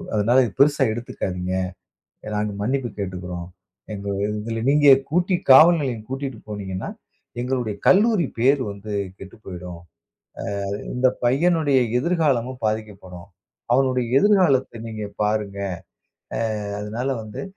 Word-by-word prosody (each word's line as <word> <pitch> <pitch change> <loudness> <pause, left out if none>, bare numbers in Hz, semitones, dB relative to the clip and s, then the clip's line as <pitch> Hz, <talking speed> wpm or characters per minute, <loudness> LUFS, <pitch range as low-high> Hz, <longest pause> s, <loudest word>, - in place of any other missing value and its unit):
அதனால 115 +5 +3
இத 110 - -5
பெரிசா 145 -1 +4
எடுத்துக்காதீங்க. 95 -6 -4 0.8
நாங்க 105 0 -1
மன்னிப்பு 130 +2 -1
கேட்டுக்குறோம். 90 -2 -5 0.4
"எங்கள 100 -1 -4
இதுல 110 +2 -3
நீங்க 145 0 +4 0.2
கூட்டி 180 +3 +1 0.2
காவல் 160 +5 +8
நிலையம் 120 -6 -3
கூட்டிட்டு 135 -3 -4
போனீங்கன்னா, 95 -3 -5 0.5
எங்களுடைய 125 -4 -2
கல்லூரி 205 - +4
பெயர் 135 +3 +4
வந்து 100 +1 -8 0.3
கெட்டு 95 +3 -11
போய்டும். 90 -2 -8 0.9
அ - - -3 0.2
இந்த 130 +1 +3 0.2
பையனுடைய 145 +1 +3 0.2
எதிர்காலமும் 135 -7 0
பாதிக்கப்படும். 100 -5 -5 0.5
அவனுடைய 130 -2 +2
எதிர்காலத்த 150 - +3
நீங்க 110 -1 -5 0.2
பாருங்க. 105 -2 -1 0.8
அ - - -1 0.4
அதனால 115 +6 -3
வந்து, 105 -1 -7
115 Hz, 115 wpm, -22 LUFS, 100-135 Hz, 0.9 s, காவல்